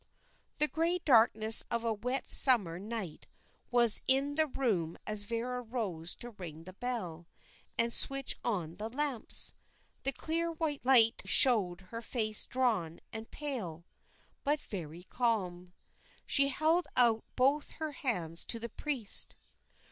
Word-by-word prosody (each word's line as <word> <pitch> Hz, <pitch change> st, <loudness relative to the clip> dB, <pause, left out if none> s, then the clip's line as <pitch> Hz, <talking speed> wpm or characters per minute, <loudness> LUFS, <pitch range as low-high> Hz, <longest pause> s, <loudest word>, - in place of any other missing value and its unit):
The 300 Hz, -, +1 dB
grey 330 Hz, +3 st, -1 dB
darkness 225 Hz, -4 st, +6 dB
of 235 Hz, 0 st, -2 dB
a 230 Hz, -1 st, -1 dB
wet 250 Hz, +6 st, -4 dB
summer 200 Hz, -11 st, +7 dB
night 205 Hz, -5 st, -7 dB, 0.4 s
was 240 Hz, -3 st, +6 dB
in 275 Hz, +2 st, +1 dB
the 315 Hz, +1 st, +1 dB
room 205 Hz, -, -2 dB
as 210 Hz, -1 st, -2 dB
Vera 240 Hz, +3 st, -4 dB
rose 205 Hz, -9 st, -5 dB
to 240 Hz, -, -9 dB
ring 170 Hz, -7 st, -10 dB
the 185 Hz, +2 st, -12 dB
bell 185 Hz, -8 st, -5 dB, 0.5 s
and 235 Hz, 0 st, +1 dB
switch 275 Hz, -1 st, +1 dB
on 175 Hz, -8 st, -3 dB
the 215 Hz, +2 st, -5 dB
lamps. 270 Hz, -2 st, 0 dB, 0.5 s
The 275 Hz, -, +1 dB
clear 330 Hz, +5 st, -3 dB
white 310 Hz, -3 st, -4 dB
light 240 Hz, -3 st, +5 dB
showed 200 Hz, -9 st, +3 dB
her 230 Hz, 0 st, -7 dB
face 215 Hz, -3 st, -2 dB
drawn 220 Hz, -11 st, -1 dB
and 220 Hz, 0 st, -8 dB
pale, 205 Hz, -, -5 dB, 0.6 s
but 295 Hz, +2 st, 0 dB
very 175 Hz, -, -8 dB
calm. 185 Hz, -6 st, -3 dB, 0.5 s
She 280 Hz, -1 st, +2 dB
held 315 Hz, +5 st, 0 dB
out 230 Hz, -3 st, +3 dB
both 275 Hz, +3 st, 0 dB
her 315 Hz, -1 st, -5 dB
hands 175 Hz, -, -4 dB
to 230 Hz, -, +3 dB
the 235 Hz, +1 st, -7 dB
priest. 250 Hz, -4 st, 0 dB
230 Hz, 140 wpm, -31 LUFS, 195-270 Hz, 0.6 s, summer